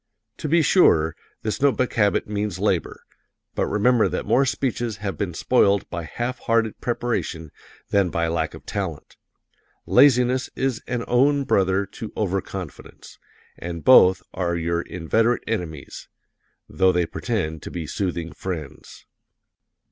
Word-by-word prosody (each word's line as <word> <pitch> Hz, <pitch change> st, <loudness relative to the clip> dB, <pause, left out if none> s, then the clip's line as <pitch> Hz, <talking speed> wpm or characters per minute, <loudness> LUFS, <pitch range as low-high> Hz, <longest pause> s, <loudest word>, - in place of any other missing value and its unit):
To 150 Hz, -, -4 dB
be 165 Hz, +1 st, +4 dB
sure, 80 Hz, -, +4 dB, 0.3 s
this 110 Hz, +3 st, -3 dB
note 140 Hz, -1 st, +3 dB
book 130 Hz, -, 0 dB
habit 105 Hz, -4 st, +2 dB
means 105 Hz, -3 st, -3 dB
labor, -, -, -1 dB, 0.5 s
but -, -, -1 dB
remember 115 Hz, +2 st, +3 dB
that -, -, -3 dB
more 135 Hz, +1 st, +3 dB
speeches 120 Hz, -5 st, -2 dB
have 100 Hz, -2 st, -4 dB
been 95 Hz, -5 st, -3 dB
spoiled 100 Hz, -2 st, +2 dB
by 85 Hz, -2 st, -4 dB
half 120 Hz, +9 st, -4 dB
hearted 115 Hz, -1 st, 0 dB
preparation 115 Hz, -10 st, -3 dB, 0.4 s
than 100 Hz, -3 st, +3 dB
by 85 Hz, 0 st, -1 dB
lack 80 Hz, 0 st, -2 dB
of -, -, -13 dB
talent. -, -, -5 dB, 0.7 s
Laziness 130 Hz, -1 st, +4 dB
is 130 Hz, -3 st, -1 dB
an 125 Hz, -2 st, -2 dB
own 140 Hz, +3 st, +3 dB
brother 95 Hz, -4 st, +1 dB
to 110 Hz, +3 st, -9 dB
Over 95 Hz, -2 st, 0 dB
confidence, 95 Hz, -4 st, -10 dB, 0.4 s
and 85 Hz, -1 st, -6 dB
both 95 Hz, -8 st, +6 dB
are 85 Hz, -2 st, -1 dB
your 85 Hz, 0 st, -1 dB
inveterate 110 Hz, +9 st, 0 dB
enemies, 85 Hz, -10 st, -5 dB, 0.6 s
though 95 Hz, -1 st, +2 dB
they 90 Hz, -1 st, +1 dB
pretend 80 Hz, -5 st, -3 dB
to -, -, -7 dB
be 85 Hz, -2 st, -5 dB
soothing 85 Hz, 0 st, -3 dB
friends. 80 Hz, -7 st, -7 dB
100 Hz, 140 wpm, -23 LUFS, 85-120 Hz, 0.7 s, both